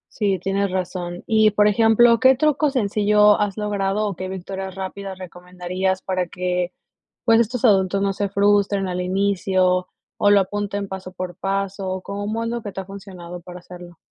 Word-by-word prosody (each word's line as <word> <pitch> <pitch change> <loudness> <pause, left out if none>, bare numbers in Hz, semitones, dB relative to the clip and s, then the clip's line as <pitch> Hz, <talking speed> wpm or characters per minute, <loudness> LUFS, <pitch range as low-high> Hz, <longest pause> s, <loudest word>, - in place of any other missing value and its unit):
Sí, 200 -3 0
tienes 195 +2 -1
razón. 180 -1 -4
Y, 220 -1 +4
por 210 0 +3
ejemplo, 225 +2 +5
¿qué 260 +1 +6
truco 300 +1 +2
sencillo 210 -3 +3
has 205 -1 -1
logrado, 210 0 -1
o 200 - -4
qué 185 +2 -5
victorias 190 +1 -6
rápidas 190 0 -6
recomendarías 180 +1 -4
para 185 -1 -1
que, 180 0 -2 0.5
pues, 230 -1 +5
estos 235 +2 -1
adultos 195 -3 +3
no 200 0 +1
se 200 +1 -2
frustren 200 0 +2
al 180 -1 -3
inicio, 185 -1 +1 0.3
o 205 - +4
lo 205 - +6
apunten 205 +1 -3
paso 190 -1 -7
por 180 -1 -6
paso? 195 0 -3
¿O 185 0 -3
cómo 205 +4 -4
es 230 - -2
lo 235 0 -3
que 205 - -5
te 195 - -6
ha - - -13
funcionado 185 -3 -9
para 180 +1 -10
hacerlo? 175 -1 -12
195 Hz, 180 wpm, -22 LUFS, 185-205 Hz, 0.5 s, qué